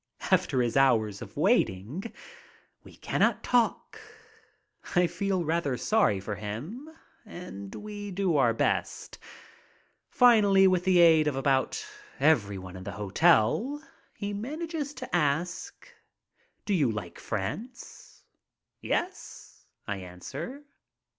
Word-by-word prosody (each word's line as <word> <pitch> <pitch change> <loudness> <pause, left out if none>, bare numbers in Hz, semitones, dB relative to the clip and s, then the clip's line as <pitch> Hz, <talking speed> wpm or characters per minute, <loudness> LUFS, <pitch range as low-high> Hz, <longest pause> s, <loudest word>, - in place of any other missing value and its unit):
After 125 -2 +2
his 120 - -2
hours 115 -7 +3
of - - -10
waiting 120 - 0 0.7
we - - -15
cannot - - 0
talk. 240 -2 0 0.9
I 180 0 +5
feel 190 0 -1
rather 155 -5 0
sorry 205 - +2
for 100 +2 -5
him 145 - -7 0.3
and 175 - -9
we 205 -1 -7
do 190 -3 0
our 130 -5 +4
best. 115 - -2 0.9
Finally, 205 -6 +5
with 185 -1 +1
the 185 -1 +4
aid 165 -3 +6
of 145 - 0
about 135 0 0 0.3
everyone 100 -11 +1
in 95 - -8
the 100 0 -6
hotel 110 - +2 0.4
he 205 0 -4
manages 295 +6 -4
to - - -5
ask: 170 +3 -1 0.8
"Do 205 - 0
you 145 -10 +2
like 100 -5 -7
France?" 115 - -6 0.6
"Yes," 370 +1 -5 0.2
I 100 -2 -2
answer. 95 - -8
165 Hz, 115 wpm, -28 LUFS, -, 0.9 s, aid